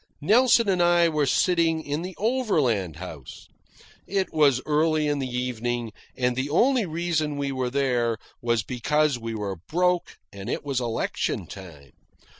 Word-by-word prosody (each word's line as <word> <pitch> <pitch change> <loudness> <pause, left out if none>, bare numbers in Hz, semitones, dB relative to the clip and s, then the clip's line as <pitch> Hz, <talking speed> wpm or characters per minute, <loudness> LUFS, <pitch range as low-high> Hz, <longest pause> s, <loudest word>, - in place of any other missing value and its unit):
Nelson 230 - +4
and 185 -3 +2
I 175 -1 +4
were 150 -3 0
sitting 165 +2 +2
in 145 +2 -3
the 180 +1 -6
Overland 155 - 0
House. 80 -6 -10 0.6
It 195 -1 -1
was 145 -5 +4
early 155 0 +2
in 145 -1 0
the 135 - -2
evening, 120 -2 -2 0.3
and 125 -1 +1
the 130 +3 -2
only 240 - +3
reason 160 -3 -1
we 140 -1 -2
were 130 -2 -2
there 125 -4 0 0.2
was 115 -3 +1
because 140 +4 0
we 115 -1 -5
were 100 -3 -4
broke 180 +1 0 0.2
and 100 +3 -7
it - - -3
was 135 -3 -1
election 115 -2 -2
time. 80 -9 -12
145 Hz, 155 wpm, -25 LUFS, 120-170 Hz, 0.6 s, Nelson